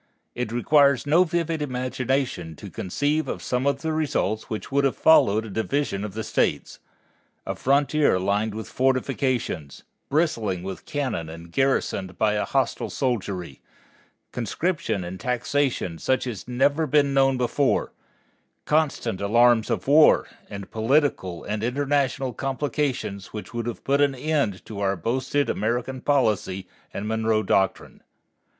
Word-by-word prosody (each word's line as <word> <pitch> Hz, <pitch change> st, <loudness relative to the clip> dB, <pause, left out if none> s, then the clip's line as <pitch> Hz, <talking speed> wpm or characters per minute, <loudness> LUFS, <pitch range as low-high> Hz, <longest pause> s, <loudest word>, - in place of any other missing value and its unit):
It 120 Hz, -2 st, -3 dB
requires 140 Hz, +2 st, +3 dB
no 160 Hz, +5 st, +5 dB
vivid 165 Hz, -2 st, -1 dB
imagination 130 Hz, -, -2 dB
to -, -, -10 dB
conceive 145 Hz, -, -1 dB
of -, -, -4 dB
some 125 Hz, +2 st, 0 dB
of 140 Hz, -, 0 dB
the 160 Hz, -1 st, -1 dB
results 130 Hz, -9 st, -1 dB
which 110 Hz, -, -5 dB
would 140 Hz, +1 st, +2 dB
have 135 Hz, -, +1 dB
followed 110 Hz, -9 st, +5 dB
a -, -, -8 dB
division 110 Hz, -1 st, -1 dB
of 105 Hz, -2 st, -6 dB
the 110 Hz, -, -3 dB
states -, -, -1 dB, 0.7 s
a -, -, -2 dB
frontier 140 Hz, -2 st, +2 dB
lined 100 Hz, +3 st, 0 dB
with 110 Hz, -, -6 dB
fortifications, 130 Hz, -, -1 dB, 0.3 s
bristling 115 Hz, -, 0 dB
with 95 Hz, 0 st, -7 dB
cannon 130 Hz, -, -2 dB
and 85 Hz, +1 st, -10 dB
garrisoned 100 Hz, -7 st, 0 dB
by 105 Hz, -1 st, +2 dB
a 105 Hz, -, 0 dB
hostile -, -, -1 dB
soldiery; 95 Hz, -, -3 dB, 0.7 s
conscription 120 Hz, -, -2 dB
and 90 Hz, +2 st, -7 dB
taxation 125 Hz, -, -1 dB
such 130 Hz, 0 st, 0 dB
as 110 Hz, -8 st, -5 dB
had 125 Hz, -, -7 dB
never 145 Hz, +5 st, +2 dB
been 140 Hz, 0 st, +3 dB
known 135 Hz, -1 st, +3 dB
before; 125 Hz, +3 st, +1 dB, 0.7 s
constant 140 Hz, -10 st, 0 dB
alarms 115 Hz, +2 st, +4 dB
of -, -, -2 dB
war; 150 Hz, +2 st, +6 dB, 0.2 s
and 100 Hz, -1 st, -8 dB
political 115 Hz, -, +1 dB
and 105 Hz, +1 st, -3 dB
international 135 Hz, 0 st, 0 dB
complications 135 Hz, -6 st, -2 dB
which 105 Hz, +2 st, -7 dB
would 120 Hz, 0 st, -3 dB
have 120 Hz, -, -5 dB
put 140 Hz, +1 st, +2 dB
an 140 Hz, -2 st, +3 dB
end 135 Hz, -8 st, -1 dB
to 105 Hz, -2 st, -7 dB
our 100 Hz, -1 st, +1 dB
boasted 130 Hz, -, -1 dB
American 120 Hz, +4 st, -2 dB
policy 105 Hz, -10 st, 0 dB, 0.2 s
and 105 Hz, -, -5 dB
Monroe 110 Hz, 0 st, +1 dB
Doctrine. 95 Hz, -2 st, 0 dB
125 Hz, 145 wpm, -24 LUFS, 105-140 Hz, 0.7 s, war